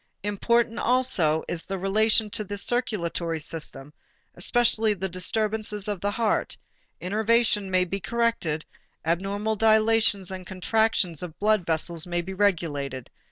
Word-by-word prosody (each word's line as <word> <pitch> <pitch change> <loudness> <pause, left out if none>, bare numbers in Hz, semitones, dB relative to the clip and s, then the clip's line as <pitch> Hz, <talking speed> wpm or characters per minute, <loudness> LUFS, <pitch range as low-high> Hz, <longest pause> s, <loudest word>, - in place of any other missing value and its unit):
Important 230 +3 +1
also 220 -11 +2
is 170 -1 -3
the 195 - -3
relation 215 +3 +2
to 215 - -1
the 205 0 -6
circulatory 190 -8 -1
system, 150 -2 -3 0.4
especially 220 +2 +2
the 190 0 -3
disturbances 210 +2 -2
of 205 -4 -3
the 205 - 0
heart: 220 +1 -1 0.4
innervation 215 +1 +1
may 185 -1 +2
be 195 +3 -3
corrected, 225 -9 -1 0.4
abnormal 200 +6 -1
dilations 220 -3 +4
and 185 -1 -7
contractions 190 -3 0
of 175 -3 -7
blood 210 -3 +1
vessels 165 +1 -1
may 175 0 -2
be 190 +2 -6
regulated. 150 -10 -1
200 Hz, 130 wpm, -25 LUFS, 175-220 Hz, 0.4 s, dilations